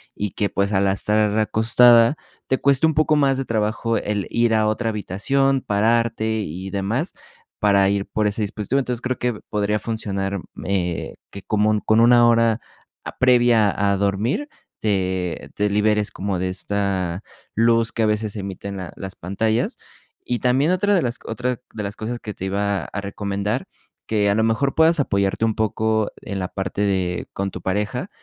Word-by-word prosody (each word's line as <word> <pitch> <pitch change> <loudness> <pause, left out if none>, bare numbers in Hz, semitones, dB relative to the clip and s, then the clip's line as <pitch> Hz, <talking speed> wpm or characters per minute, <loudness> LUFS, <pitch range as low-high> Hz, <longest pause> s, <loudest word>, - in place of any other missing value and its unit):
y 105 -2 -3
que, 100 +3 -1
pues, 100 +1 -1
al 100 0 +2
estar 105 +2 +1
acostada 115 +3 +5 0.3
te 130 - +1
cueste 140 +2 +4
un 160 - +1
poco 155 0 +3
más 135 -2 +3
de 135 - -1
trabajo 110 +1 0
el 105 -2 -2
ir 115 -1 +2
a 110 -1 +2
otra 115 +2 0
habitación, 130 +7 0
pararte 110 +2 +1
y 95 0 -5
demás 105 - -2 0.5
para 100 -2 +4
ir 100 0 0
por 110 - -1
ese 105 +1 0
dispositivo. 105 +5 -1
Entonces 125 -3 -3
creo 130 -1 -2
que 125 0 0 0.2
podría 105 0 0
funcionar, 100 -3 -3 0.3
eh, 90 -3 -2
que 100 - -9
como 105 0 +1
con 110 +1 +3
1 120 +1 +6
hora 115 -1 +3 0.4
a - - -8
previa 120 -4 +4
a 100 0 0
a - - 0
dormir, 100 - 0 0.3
te 95 -4 -1
te 105 0 +1
liberes 105 0 +1
como 95 -2 -3
de 95 - -1
esta 95 -2 -2 0.3
luz 115 0 +3
que 115 - 0
a - - +4
veces 105 0 -1
emiten 100 0 -6 0.2
las 95 -1 -7
pantallas 110 +5 -1 0.5
y 120 -1 -1
también 130 +6 +2
otra 205 +3 +2
de 180 - +3
las 120 -3 -2
otras 125 +2 -2
de 105 - -5
las 100 +1 -5
cosas 120 +2 -4
que 105 - -7
te 95 - -6
iba 100 -1 -1
a 105 - -5
recomendar, 100 +3 -3 0.4
que 105 -2 +1
a 100 - +2
lo 110 - +2
mejor 115 +5 +1
puedas 160 0 +4
apoyarte 100 -4 0
un 110 -1 0
poco 110 0 0
en 100 -1 -5
la 90 - -2
parte 95 +1 -4
de 95 -3 0
con 100 0 -2
tu - - -8
pareja, 105 - -2
105 Hz, 180 wpm, -22 LUFS, 100-115 Hz, 0.5 s, 1